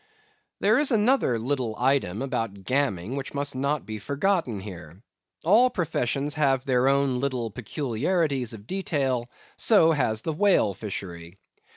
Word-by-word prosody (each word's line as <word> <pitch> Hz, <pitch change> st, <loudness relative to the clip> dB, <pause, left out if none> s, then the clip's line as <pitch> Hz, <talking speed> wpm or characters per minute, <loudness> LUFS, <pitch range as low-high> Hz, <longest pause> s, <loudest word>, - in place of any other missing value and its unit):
_ -, -, -36 dB, 0.6 s
There 215 Hz, +6 st, +4 dB
is 295 Hz, -, +3 dB
another 225 Hz, -, +2 dB
little 120 Hz, -1 st, -2 dB
item 130 Hz, -5 st, +1 dB
about 115 Hz, -7 st, -3 dB
Gamming 125 Hz, -4 st, -1 dB
which 140 Hz, 0 st, -5 dB
must 140 Hz, -1 st, -2 dB
not 140 Hz, +2 st, -1 dB
be 110 Hz, -1 st, -6 dB
forgotten 140 Hz, -, 0 dB
here. 90 Hz, -4 st, -10 dB, 0.5 s
All 225 Hz, +8 st, +6 dB
professions 145 Hz, -, -1 dB
have 135 Hz, -4 st, +1 dB
their 130 Hz, -1 st, +2 dB
own 140 Hz, -2 st, +2 dB
little 125 Hz, -4 st, -2 dB
peculiarities 130 Hz, -, -1 dB
of 105 Hz, -2 st, -11 dB
detail; 135 Hz, -, -1 dB, 0.3 s
so 180 Hz, -8 st, +5 dB
has 110 Hz, -8 st, 0 dB
the 160 Hz, -, -2 dB
whale 160 Hz, -, +3 dB
fishery. 90 Hz, -3 st, -7 dB
135 Hz, 145 wpm, -26 LUFS, 110-150 Hz, 0.6 s, All